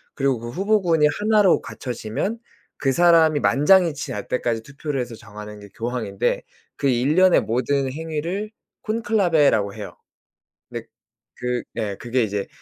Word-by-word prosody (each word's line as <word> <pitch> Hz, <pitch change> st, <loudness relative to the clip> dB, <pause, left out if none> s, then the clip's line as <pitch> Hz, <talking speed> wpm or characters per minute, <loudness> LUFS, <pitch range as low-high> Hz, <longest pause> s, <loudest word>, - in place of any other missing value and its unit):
그리고 135 Hz, -4 st, +1 dB
그 120 Hz, -, -7 dB
후보군이 180 Hz, -, +2 dB
하나로 210 Hz, -3 st, +4 dB
갖춰지면 125 Hz, -, -4 dB, 0.4 s
그 135 Hz, -, +1 dB
사람이 165 Hz, -1 st, +5 dB
만장일치 155 Hz, 0 st, +3 dB
날 105 Hz, -, -5 dB
때까지 120 Hz, -2 st, -1 dB
투표를 140 Hz, +2 st, -5 dB
해서 120 Hz, -1 st, -6 dB
정하는 105 Hz, 0 st, -10 dB
게 100 Hz, -, -12 dB
교황인데 115 Hz, -4 st, -2 dB, 0.3 s
그 140 Hz, -, -1 dB
일련의 150 Hz, +9 st, +4 dB
모든 130 Hz, +3 st, 0 dB
행위를 165 Hz, +7 st, -4 dB, 0.3 s
콘클라베라고 175 Hz, -, +2 dB
해요. 105 Hz, -2 st, -8 dB, 0.7 s
근데 -, -, -6 dB, 0.5 s
그 125 Hz, 0 st, -2 dB
예 105 Hz, -4 st, -2 dB
그게 120 Hz, +2 st, -1 dB
이제 100 Hz, -2 st, -2 dB
140 Hz, 310 characters per minute, -22 LUFS, 115-170 Hz, 0.7 s, 사람이